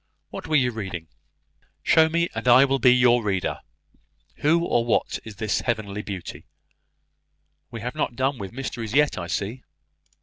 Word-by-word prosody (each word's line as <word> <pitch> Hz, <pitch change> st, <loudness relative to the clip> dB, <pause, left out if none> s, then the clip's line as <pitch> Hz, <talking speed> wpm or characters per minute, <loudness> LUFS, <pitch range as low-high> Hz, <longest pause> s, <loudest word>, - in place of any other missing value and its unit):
What -, -, -7 dB
were 155 Hz, -, 0 dB
you 125 Hz, -4 st, +3 dB
reading? 95 Hz, -7 st, -6 dB, 0.7 s
Show 160 Hz, 0 st, +5 dB
me, 170 Hz, +1 st, +1 dB
and -, -, -5 dB
I 125 Hz, +3 st, +7 dB
will 135 Hz, 0 st, 0 dB
be 125 Hz, -, +6 dB
your 125 Hz, -1 st, +4 dB
reader. 95 Hz, -3 st, -1 dB, 0.8 s
Who 165 Hz, +3 st, +2 dB
or 120 Hz, -, +1 dB
what 120 Hz, -, 0 dB
is 110 Hz, -2 st, -10 dB
this 105 Hz, +2 st, -1 dB
Heavenly 105 Hz, -3 st, -2 dB
Beauty? 95 Hz, -4 st, -8 dB, 1.2 s
We 115 Hz, -3 st, -8 dB
have 125 Hz, +2 st, -4 dB
not 120 Hz, -, -2 dB
done 130 Hz, 0 st, -1 dB
with 95 Hz, -2 st, -6 dB
mysteries 120 Hz, -3 st, -5 dB
yet, 145 Hz, -8 st, +3 dB
I 85 Hz, -, -5 dB
see." 100 Hz, +8 st, -3 dB
120 Hz, 165 wpm, -24 LUFS, 105-135 Hz, 1.2 s, I